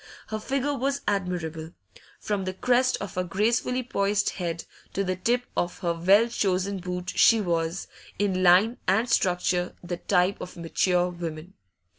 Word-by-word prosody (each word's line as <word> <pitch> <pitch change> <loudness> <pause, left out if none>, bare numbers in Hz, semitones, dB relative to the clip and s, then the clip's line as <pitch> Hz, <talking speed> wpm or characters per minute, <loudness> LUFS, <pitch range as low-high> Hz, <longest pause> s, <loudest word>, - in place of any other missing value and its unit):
Her 215 0 -3
figure 275 +5 -1
was 275 +1 -1
admirable; 170 -5 -2 0.5
from 205 -2 -2
the 185 0 -4
crest 250 +4 +2
of 200 - -6
her 185 - -1
gracefully 230 +7 0
poised 205 -3 0
head 170 -2 -4 0.3
to 195 - 0
the 185 -1 -1
tip 240 +7 0
of 175 - -1
her 170 -2 0
well 195 +7 +4
chosen 195 -3 -1
boot 180 0 -4
she 230 - +6
was, 170 -2 -1 0.3
in 195 -3 0
line 185 +7 +5
and 220 +6 +3
structure, 180 -4 +1
the 175 0 -4
type 185 +1 +1
of 180 - -8
mature 180 +1 +1
woman. 170 0 -7
185 Hz, 155 wpm, -26 LUFS, 175-215 Hz, 0.5 s, she